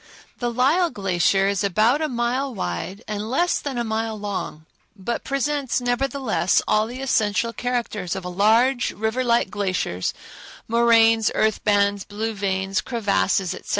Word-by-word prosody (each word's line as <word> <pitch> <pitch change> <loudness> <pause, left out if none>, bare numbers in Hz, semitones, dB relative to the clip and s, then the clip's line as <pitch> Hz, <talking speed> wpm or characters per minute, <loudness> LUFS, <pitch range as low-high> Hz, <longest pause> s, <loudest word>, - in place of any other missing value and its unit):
The 240 - -1
Lyell 285 +9 +2
Glacier 195 - +1
is 200 0 0
about 215 - +2
a 310 - 0
mile 250 +2 -1
wide 175 - -4
and 210 +1 -4
less 345 +8 +1
than 275 -3 -5
a 240 - 0
mile 220 0 -2
long, 200 -6 -5 0.3
but 215 +4 -4
presents, 275 -1 -1
nevertheless, 245 - 0
all 215 +1 +2
the 250 +3 -7
essential 230 -2 +1
characters 230 -7 -3
of 190 -2 -6
large, 225 +8 +2
river 220 +4 -1
like 235 -1 +1
glaciers—moraines, 225 - +1
earth 215 -1 +1
bands, 200 -1 +2
blue 220 +2 -4
veins, 195 -1 -1
crevasses, 200 -5 0
etc. - - -11
220 Hz, 140 wpm, -23 LUFS, 200-245 Hz, 0.3 s, Lyell